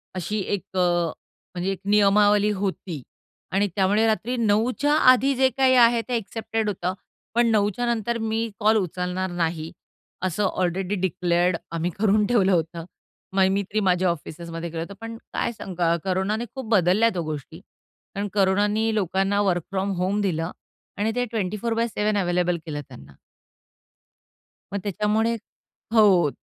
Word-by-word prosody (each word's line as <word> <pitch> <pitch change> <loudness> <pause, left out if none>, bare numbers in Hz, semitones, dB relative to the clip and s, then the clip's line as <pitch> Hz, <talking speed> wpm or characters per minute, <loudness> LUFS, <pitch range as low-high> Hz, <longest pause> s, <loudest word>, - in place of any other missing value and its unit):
अशी 185 +4 -2 0.2
एक 190 0 -9
अ, - - +3 0.8
म्हणजे 180 +2 -1
एक 195 - -5
नियमावली 205 0 +4
होती 190 -6 -3 0.5
आणि 200 +2 +2
त्यामुळे 205 +3 +3
रात्री 225 +3 0
9:00च्या 235 +6 +2 0.2
आधी 270 +2 +3
जे 260 +1 +4
काही 260 -1 +4
आहे 235 -1 +5
ते 250 - -1
एक्सेप्टेड 225 0 -3
होतं, 185 -2 -2 0.4
पण 240 0 +4
9:00च्या 210 +2 +1
नंतर 235 +1 -2
मी 225 0 -1
कॉल 220 +1 +4
उचलणार 180 0 -2
नाही 165 -2 -2 0.5
असं 185 +3 0
ऑलरेडी 185 +1 -1
डिक्लेअर्ड 180 -1 +1 0.2
आम्ही 170 +1 -1
करून 210 0 +3
ठेवलं 205 -6 +3
होतं. 165 -1 -1 0.5
मय 190 -1 +4
मी 200 +1 +1
तरी 205 +3 -2
माझ्या 185 -2 +2
ऑफिसेसमध्ये 170 +1 -5
केलं 165 0 -4
होतं. 170 +4 -6
पण 225 0 -6 0.2
काय 235 - -1
सांगा 175 -6 -1
कोरोनाने 195 +5 -1
खूप 260 -4 -6
बदलल्यात 205 +1 +3
हो 170 - -1
गोष्टी. 155 +1 -6
कारण 200 +1 -9
कोरोनानी 205 +3 +2
लोकांना 195 +1 +1
वर्क 180 -4 +1
फ्रॉम 195 +1 -1
होम 190 +3 0
दिलं 165 -3 -1 0.5
आणि 215 +2 0
ते 245 0 +1
24/7 215 +1 -1
अवेलेबल 180 -2 +1
केलं 150 -2 -4
त्यांना. 70 0 -14 1.6
मग 200 - -1
त्याच्यामुळे 210 +3 +1 0.6
हो. 195 -8 +5
200 Hz, 145 wpm, -24 LUFS, 180-220 Hz, 1.6 s, आहे